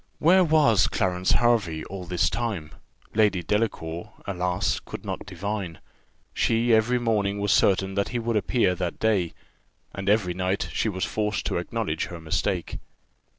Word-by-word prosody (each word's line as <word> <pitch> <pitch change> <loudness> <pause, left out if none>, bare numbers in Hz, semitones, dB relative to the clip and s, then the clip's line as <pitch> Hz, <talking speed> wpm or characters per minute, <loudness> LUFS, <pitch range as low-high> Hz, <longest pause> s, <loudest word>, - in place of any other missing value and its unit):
Where 185 +4 +5
was 150 - +4
Clarence 90 -1 +1
Hervey 105 -10 +2
all 95 -2 -7
this 90 0 +1
time? 100 -11 -3 0.4
Lady 105 -5 +2
Delacour, 100 -2 -2
alas! 90 0 -1
could - - -9
not - - -5
divine. 95 -1 -4 0.6
She 115 +1 +2
every 110 +3 +3
morning 105 -4 0
was 100 0 +1
certain 95 0 +3
that 100 0 0
he 125 - -2
would 115 -1 -1
appear 105 -1 +2
that 90 -2 -3
day, 100 -7 +1 0.6
and 100 0 -3
every 100 -4 +2
night 95 +2 -1
she 110 - 0
was 95 -2 -2
forced 105 0 -2
to - - -1
acknowledge 85 -3 -2
her 85 - -8
mistake. 80 -1 -2
100 Hz, 150 wpm, -25 LUFS, 90-110 Hz, 0.6 s, Where